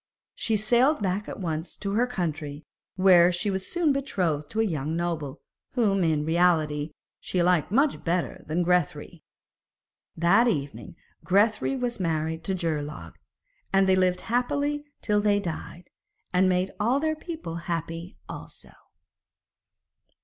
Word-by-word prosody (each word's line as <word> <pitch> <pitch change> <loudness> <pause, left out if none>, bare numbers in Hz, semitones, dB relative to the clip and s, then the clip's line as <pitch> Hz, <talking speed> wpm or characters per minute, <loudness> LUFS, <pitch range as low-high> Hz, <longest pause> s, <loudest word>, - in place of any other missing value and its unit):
She 220 -1 0
sailed 240 +5 +3
back 195 +2 -1
at - - -7
once 165 -2 -4
to 200 - -3
her 235 +5 +2
country, 155 -8 -4 0.3
where 180 -2 +6
she 175 +4 0
was 190 0 -2
soon 335 -5 +2
betrothed 180 - -1
to 220 - -3
a - - +4
young 160 -6 -2
noble, 165 -5 -3 0.3
whom, 200 -6 +2
in 155 -2 +1
reality, 160 -3 +2 0.3
she 180 -2 0
liked 180 -1 +2
much 275 +6 +2
better 175 +1 -1
than 165 +3 0
Grethari. 170 -2 0 1.0
That 190 +9 +4
evening 145 -6 -3 0.3
Grethari 210 +7 +2
was 245 -3 -2
married 160 -2 -1
to 190 - 0
Geirlaug, 155 -4 -3 0.6
and 195 0 +4
they 190 - +5
lived 180 -1 +2
happily 285 +5 -1 0.2
till 210 -1 +2
they 205 -1 +3
died, 175 -1 -6 0.4
and 185 +1 +4
made 185 +1 +1
all 240 +6 +2
their 315 +1 0
people 310 - -6
happy 165 +1 -4
also. - - -7
180 Hz, 140 wpm, -26 LUFS, 165-215 Hz, 1.0 s, where